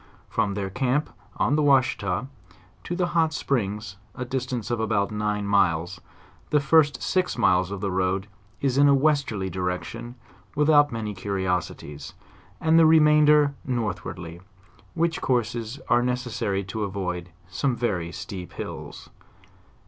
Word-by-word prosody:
From 100 -1 0
their 100 -2 -3
camp, 130 +7 0 0.3
on 145 - +2
the 155 - +2
V^ashita, 130 -7 +2 0.6
to 175 - -3
the 180 0 +1
hot 165 -2 +2
springs, 105 -8 -2 0.2
a 125 - -4
distance 125 -2 -3
of 120 - 0
about 110 -2 0
nine 105 -1 -1
miles, 90 -3 +1 0.5
the 150 - +3
first 145 -2 +3
six 185 -5 0
miles 90 -5 +3
of 100 -1 -5
the 100 -2 -1
road 95 +1 0 0.4
is 135 -1 +1
in 145 - +6
a 140 - +6
westerly 140 -9 +1
direction 95 +7 -4 0.4
without 145 -1 +4
many 110 -2 -4
curiosities, 90 -7 -3 0.4
and 160 +1 +4
the 160 - +7
remainder 150 -2 +5
northwardly, 90 -8 -4 0.5
which 165 -1 0
courses 120 0 -1
are 120 0 +4
necessary 120 -5 -1
to 100 +3 -5
avoid 90 -3 -4 0.2
some 125 +8 -1
very 95 -8 -2
steep 90 0 -7
hills. - - -8
115 Hz, 135 wpm, -25 LUFS, 95-140 Hz, 0.6 s, the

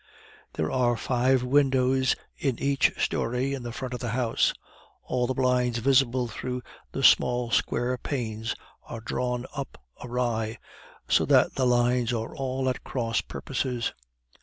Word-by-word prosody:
There 80 - -1
are 120 -2 +2
five 130 +1 +2
windows 130 -1 +3 0.2
in 130 -5 -1
each 140 0 +2
story 125 +4 0
in 135 - -4
the 120 -1 -5
front 125 +1 -5
of 125 - -4
the 120 - -3
house; 115 0 +2 0.5
all 125 -1 0
the 130 - -1
blinds 125 -2 +2
visible 130 0 +3
through 125 +2 -5 0.3
the - - -3
small 120 -1 +4
square 120 +3 +1
panes 115 -5 -3 0.3
are 115 - -8
drawn 125 +2 -2
up 140 -2 -5 0.3
awry, 120 -2 -1 0.5
so - - +4
that - - +4
the 130 -1 +1
lines 120 0 +2
are 115 -1 -3
all 130 0 -2
at 130 - -1
cross 115 -3 -1
purposes. 125 -2 -3
125 Hz, 145 wpm, -27 LUFS, 120-130 Hz, 0.5 s, small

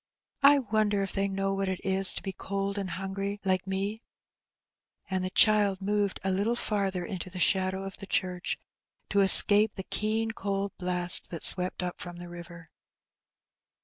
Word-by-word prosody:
1 280 -4 +3
wonder 210 -2 0
if 195 - -5
they 195 0 -1
know 195 0 -3
what 195 0 -3
it 185 -1 -4
is 190 0 +3
to - - -7
be 195 - -6
cold 195 +1 -5
and 195 -2 -5
hungry 195 +2 -5
like 185 0 -1
me? 200 +3 -4 0.5
" - - -45
And 185 -1 -2
the 185 - -3
child 205 -1 +3
moved 205 0 -2
a 190 - -2
little 205 +5 -1
farther 195 -6 -3
into 185 -1 -7
the 185 0 -7
shadow 190 +1 0
of 195 0 -8
the 195 - -10
church, 180 -2 -3 0.5
to 200 - 0
escape 205 +2 +7
the 190 - -6
keen 220 +3 -2
cold 200 -2 -4
blast 180 -1 +1
that 170 - -5
swept 180 0 +6
up 180 -1 -7
from 175 -1 -8
the 175 0 -9
river. 170 -1 -13
195 Hz, 180 wpm, -26 LUFS, 185-205 Hz, 0.5 s, escape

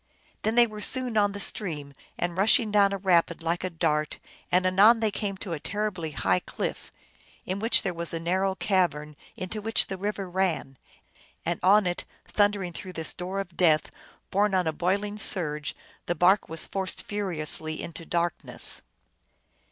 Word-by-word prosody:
Then 220 +1 0
they 240 0 +7
were 215 -2 -8
soon 255 0 0
on 205 -1 +3
the 205 - -6
stream, 150 -9 -3 0.2
and 175 0 -2
rushing 215 +3 +4
down 200 -1 +5
a 200 - -1
rapid 175 -3 +2
like 170 +2 -1
a 185 - -1
dart. 155 -3 -1 0.3
And 180 +1 +3
anon 200 +5 +6
they 220 -2 +1
came 200 -1 -3
to 185 -2 -4
a 160 - -4
terribly 200 -3 -3
high 95 -10 +1
cliff, - - -5 0.5
in 185 +2 -3
which 225 +3 +4
there 190 -3 -1
was 170 0 -3
a 165 - -3
narrow 190 +3 0
cavern 175 -6 0 0.2
into 200 +4 -5
which 225 +2 +3
the 190 - -5
river 200 -1 -3
ran. 175 -7 -1 0.7
And 170 - -1
on 205 +2 +5
it, 175 0 -2 0.2
thundering 205 -4 +1
through 185 +2 -7
this 160 -2 -2
door 185 +2 -4
of 180 -3 -6
death, 160 -4 +3 0.4
borne 200 0 +2
on 185 -1 +2
a 160 - 0
boiling 200 +5 -1
surge, 150 -7 0 0.3
the 175 - 0
bark 185 +5 +3
was 160 0 -1
forced 190 -1 -2
furiously 160 -6 -1
into 170 0 -6
darkness. 170 +1 -1
185 Hz, 175 wpm, -27 LUFS, 170-205 Hz, 0.7 s, they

